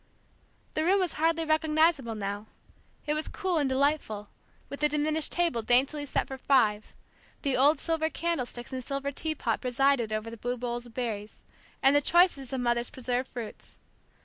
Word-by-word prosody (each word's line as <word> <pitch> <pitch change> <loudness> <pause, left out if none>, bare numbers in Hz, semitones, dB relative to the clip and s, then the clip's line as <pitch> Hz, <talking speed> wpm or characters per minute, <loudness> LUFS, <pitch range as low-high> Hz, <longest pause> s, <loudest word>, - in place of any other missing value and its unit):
The 310 - 0
room 380 +4 +3
was 365 -3 0
hardly 330 0 +2
recognizable 310 -5 +2
now. 205 +1 -4 0.6
It 300 - 0
was 305 +1 -2
cool 370 -5 -1
and 285 -3 +1
delightful, 260 -7 0 0.4
with 280 - -7
the 300 0 +3
diminished 300 +1 +1
table 340 -9 +1
daintily 270 +6 +2
set - - 0
for 265 -1 -7
five, 220 -7 +2 0.5
The 275 -3 +1
old 285 +5 +5
silver 320 -1 0
candlesticks 265 -8 -3
and 255 -1 -3
silver 275 +1 -3
teapot 285 -6 -1
presided 255 -2 +2
over 215 +2 -3
blue 245 +2 -3
bowls 240 0 -4
of 230 - -17
berries, 215 -4 -4 0.4
and 270 +1 +6
the 290 - +5
choicest 335 -5 +3
of 265 -2 -2
Mother's 240 0 0
preserved 255 0 -2
fruits. 235 -4 -8
270 Hz, 165 wpm, -28 LUFS, 240-310 Hz, 0.6 s, and